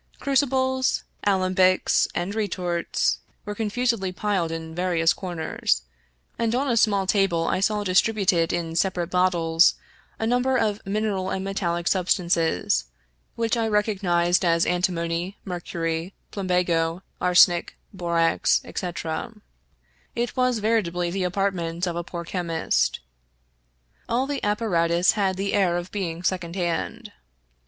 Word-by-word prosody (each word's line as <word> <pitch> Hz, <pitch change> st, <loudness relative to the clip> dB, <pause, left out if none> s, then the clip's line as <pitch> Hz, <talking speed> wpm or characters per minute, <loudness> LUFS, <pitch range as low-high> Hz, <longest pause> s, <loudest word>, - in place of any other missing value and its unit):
Crucibles, 260 Hz, -1 st, +1 dB, 0.2 s
alembics, 185 Hz, -1 st, +3 dB
and 175 Hz, +3 st, -2 dB
retorts 180 Hz, -5 st, -1 dB, 0.3 s
were 210 Hz, -, -4 dB
confusedly 220 Hz, -2 st, -1 dB
piled 185 Hz, -3 st, -1 dB
in 160 Hz, 0 st, -6 dB
various 175 Hz, -1 st, +2 dB
comers, 160 Hz, -, -2 dB, 0.6 s
and 230 Hz, 0 st, +1 dB
on 275 Hz, +3 st, 0 dB
a 240 Hz, -, +1 dB
small 205 Hz, -4 st, +3 dB
table 190 Hz, -4 st, +2 dB
I -, -, 0 dB
saw 210 Hz, +1 st, +1 dB
distributed 190 Hz, -3 st, +2 dB
in 165 Hz, -1 st, -3 dB
separate 175 Hz, -1 st, 0 dB
bottles 175 Hz, -2 st, +3 dB, 0.4 s
a 225 Hz, -, -2 dB
number 250 Hz, +3 st, +2 dB
of 215 Hz, -3 st, 0 dB
mineral 200 Hz, -2 st, -1 dB
and 190 Hz, 0 st, -3 dB
metallic 175 Hz, -3 st, -2 dB
substances, 170 Hz, -, +1 dB, 0.5 s
which 230 Hz, 0 st, 0 dB
I 230 Hz, -1 st, 0 dB
recognized 190 Hz, -5 st, +1 dB
as 170 Hz, -1 st, +3 dB
antimony, 175 Hz, +1 st, -1 dB
mercury, 170 Hz, -1 st, -3 dB, 0.2 s
plumbago, 180 Hz, -3 st, 0 dB, 0.2 s
arsenic, 175 Hz, -1 st, +4 dB, 0.2 s
borax, 170 Hz, -3 st, +2 dB
etc. 175 Hz, +4 st, -4 dB, 0.8 s
It 240 Hz, -1 st, -2 dB
was 255 Hz, -2 st, +2 dB
veritably 180 Hz, -6 st, 0 dB
the 190 Hz, 0 st, -1 dB
apartment 180 Hz, -2 st, -1 dB
of 175 Hz, -2 st, -3 dB
a 170 Hz, -, -2 dB
poor 170 Hz, 0 st, -6 dB
chemist. 165 Hz, -2 st, -1 dB, 1.1 s
All 245 Hz, +3 st, +1 dB
the 285 Hz, 0 st, -4 dB
apparatus 180 Hz, -5 st, +2 dB
had 195 Hz, -3 st, 0 dB
the 200 Hz, +1 st, -2 dB
air 185 Hz, -4 st, +2 dB
of 175 Hz, +1 st, -6 dB
being 175 Hz, -4 st, -4 dB
second 180 Hz, -2 st, -2 dB
hand. 195 Hz, +5 st, -3 dB
185 Hz, 125 wpm, -24 LUFS, 170-210 Hz, 1.1 s, arsenic